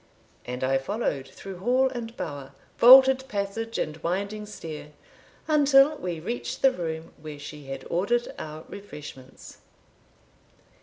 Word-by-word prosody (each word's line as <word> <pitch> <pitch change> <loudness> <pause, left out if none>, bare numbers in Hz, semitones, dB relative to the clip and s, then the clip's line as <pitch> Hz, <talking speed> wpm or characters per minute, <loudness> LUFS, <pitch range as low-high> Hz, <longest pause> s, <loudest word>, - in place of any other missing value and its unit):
And 125 +1 -4
I 135 +1 +2
followed 140 - -2
through 190 +4 -10
hall 250 +6 +3
and 235 -2 -7
bower, 140 -2 -6 0.3
vaulted 265 +2 +8
passage 220 +2 -3
and 155 0 -2
winding 200 +6 -3
stair, 155 -6 -8 0.5
until 290 -1 +5
we 175 - -4
reached 120 - -5
the 270 - +7
room 165 -6 -5
where 155 -1 -8
she 145 0 -9
had 135 0 -7
ordered 205 +8 0
our 155 +1 -7
refreshments. 150 -9 -11
185 Hz, 125 wpm, -26 LUFS, 150-240 Hz, 0.5 s, vaulted